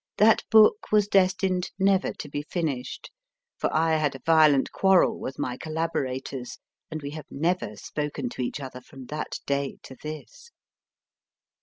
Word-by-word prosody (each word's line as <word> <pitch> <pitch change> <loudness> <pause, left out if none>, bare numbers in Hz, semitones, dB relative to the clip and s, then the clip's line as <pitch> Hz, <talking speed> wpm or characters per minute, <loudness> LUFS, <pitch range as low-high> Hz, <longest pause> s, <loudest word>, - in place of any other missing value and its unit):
that 220 +2 +5
book 220 - +6
was 210 -1 +4
destined 185 -2 +2
never 195 -1 +2
to - - -8
be 145 0 -4
finished, 150 -5 -4 0.5
for - - 0
I 160 0 +2
had 150 -3 0
a 135 - -10
violent 155 -4 +5
quarrel 190 -2 +3
with 135 - -6
my 125 0 -3
collaborators, 135 -5 -3 0.3
and 155 -2 -6
we 140 - -5
have 155 0 -8
never 165 - -1
spoken 145 +3 -4
to 125 - -6
each 125 +4 -3
other 130 -2 -8
from 130 +1 -12
that 150 0 -4
day 140 -1 -1
to 130 - -11
this. 315 - -9
155 Hz, 155 wpm, -26 LUFS, 135-185 Hz, 0.5 s, book